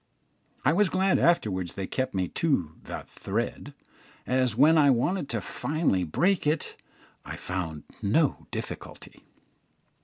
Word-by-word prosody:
I 150 - +5
was 200 +1 +3
glad 190 +2 +2
afterwards 95 - +1
they 95 - -3
kept 130 +2 -2
me 95 -1 0
to 135 - 0
"the - - -6
thread," - - -4 0.5
as 125 -3 +1
when 150 +6 +6
I 145 -3 +6
wanted 140 +6 +1
finally 155 - 0
to - - -11
break 185 - +2
it 150 +1 -1 0.5
I - - -6
found 85 -4 -4 0.2
no 135 +9 +1
difficulty. - - -8
135 Hz, 130 wpm, -27 LUFS, -, 0.5 s, when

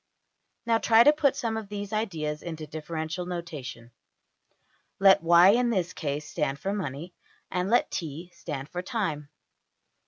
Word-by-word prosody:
Now 230 -1 +3
try 225 0 +6
to 295 - +7
put 300 -3 +2
some 225 -2 -2
of 215 -3 -6
these 205 0 -5
ideas 160 -9 -2
into 160 -2 -6
differential 160 +3 -5
notation. 145 -9 -7 1.1
Let 195 0 +6
$y$ 170 +3 +7
in 245 +1 +2
this 185 -6 -1
case 150 -1 -4
stand 140 -2 -2
for 195 +7 -3
money, 170 -2 -5 0.4
and 180 +1 -1
let 240 +2 +3
$t$ 165 +2 -5
stand 145 -3 -6
for 180 - -4
time. 180 - -3
175 Hz, 150 wpm, -27 LUFS, 150-210 Hz, 1.1 s, to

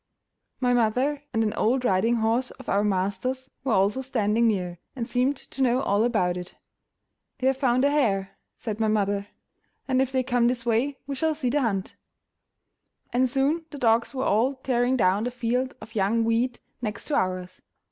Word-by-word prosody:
My 250 -1 +2
mother 250 +5 +1
and 225 -1 +1
an 215 -1 0
old 250 +4 +1
riding 215 +4 +3
horse 230 +3 +1
of - - -13
our 200 +1 +2
master's 210 +7 -1
were 260 -4 +1
also 200 +6 +2
standing 230 -3 +1
near, 180 -5 -1 0.2
and 235 -3 -3
seemed 255 +3 +1
to 270 - -7
know 250 -1 +3
all 205 +2 +2
about 185 -7 +1
it. 180 0 -8 0.8
"They 260 - -4
have 265 0 +3
found 255 -1 +2
a 285 - +3
hare," 200 -10 +1 0.2
said 215 -3 -5
my 220 - +2
mother, 200 -1 0 0.6
"and 260 -1 +2
if 265 -1 0
they 260 -1 +1
come 245 -2 +2
this 245 -1 -1
way 240 +4 +1
we 280 - -4
shall 315 +3 0
see 260 -5 -1
the 290 +2 +2
hunt." 195 -6 -2 1.2
And 255 +1 +3
soon 285 +6 +1
the 290 - -8
dogs 230 0 +2
were 260 - -1
all 240 +7 +2
tearing 250 0 +2
down 195 -2 +3
the - - 0
field 250 +1 -1
of 220 +1 -12
young 215 +3 +1
wheat 235 +2 0 0.2
next 215 -3 -4
to 295 - +1
ours. 185 -1 -2
240 Hz, 190 wpm, -26 LUFS, 210-260 Hz, 1.2 s, riding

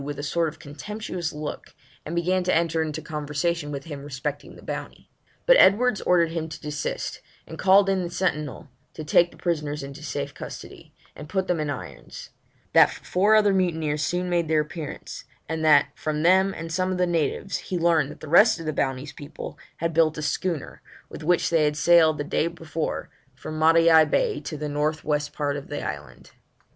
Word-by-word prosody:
with 145 0 -5
a 145 - -5
sort 165 +3 0
of - - -13
contemptuous 175 +3 -6
look, 150 0 -7 0.3
and 165 - -4
began 180 +2 +1
to 180 - +1
enter 165 -1 +1
into 155 0 -3
conversation 150 +1 -2
with 140 -1 -5
him 145 -4 -8
respecting 145 +1 -5
the - - -14
Bounty; - - -7 0.3
but - - +7
Edwards 215 +2 +5
ordered 170 -2 +3
him 165 -1 -3
to 150 - -8
desist, 150 0 -4 0.2
and 160 - -10
called 195 +1 +5
in 195 -1 +1
the 175 - -3
sentinel 155 -6 -2 0.3
to 155 - -6
take 170 +3 +4
the - - -18
prisoners 150 -4 -2
into 140 +1 -9
safe 145 -2 -4
custody, - - -10 0.2
and 150 +1 -10
to - - -15
put 190 -1 0
them 180 -2 0
in 150 -1 -2
irons; 70 - -8 0.4
that - - +7
four 205 +4 +1
other 210 -2 +4
mutineers 160 -5 0
soon 180 +4 -1
made 175 -2 0
their 155 -1 +3
appearance; 150 -1 -7 0.2
and 160 0 -3
that, 150 -2 +5
from 155 0 -3
them 190 +3 +4
and 165 -2 -7
some 185 +2 0
of 185 - -2
the 180 - +2
natives, 170 +2 -1
he 185 - -4
learned 165 -4 +2
that - - -11
the 155 - -8
rest 175 +5 +5
of 165 - -7
the 155 - -2
Bounty's 135 +2 -2
people 145 0 -9 0.2
had 165 0 -2
built 160 -1 +3
a 150 - -4
schooner, 155 +1 -3 0.3
with - - -9
which 175 +2 +2
they 160 -2 +3
had 150 0 0
sailed 160 -1 +5
the 145 - -2
day 155 - 0
before 165 -2 -4 0.2
from 155 +4 -7
Matavai 165 0 +6
Bay 440 - 0
to 155 - -6
the 150 +1 -4
north 150 +2 -1
west 150 -1 -1
part 145 -1 -2
of 140 -1 -7
the 145 - -5
island. 70 -1 -7
160 Hz, 200 wpm, -25 LUFS, 150-175 Hz, 0.4 s, but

